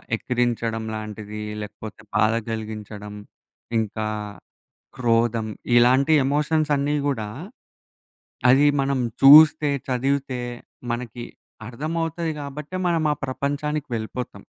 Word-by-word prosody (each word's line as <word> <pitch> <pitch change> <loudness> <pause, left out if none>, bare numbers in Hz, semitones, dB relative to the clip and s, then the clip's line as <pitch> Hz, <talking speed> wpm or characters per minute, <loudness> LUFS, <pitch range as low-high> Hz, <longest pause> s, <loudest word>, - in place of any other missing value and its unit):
ఎక్కిరించడం 115 -1 -1
లాంటిది, 105 0 -7 0.2
లేకపోతే 105 +1 -9
బాధ 110 +1 +3 0.2
గలిగించడం, 105 -2 -6 0.6
ఇంకా 110 0 -2 0.9
క్రోధం. 115 -2 +1 0.3
ఇలాంటి 130 +5 +5
ఎమోషన్సన్నీ 150 0 +1
గూడా 115 -7 -2 1.2
అది 135 +3 +5
మనం 135 -1 0 0.2
చూస్తే, 150 +1 +8 0.2
చదివితే 135 0 -1 0.5
మనకి 120 0 -5 0.4
అర్థమవుతది 165 +6 -3
గాబట్టే, 145 +4 -6
మనం 165 -2 +1
ఆ - - 0
ప్రపంచానికి 145 +3 -2
వెళ్ళిపోతాం. 115 +2 -5
125 Hz, 85 wpm, -23 LUFS, 110-145 Hz, 1.2 s, చూస్తే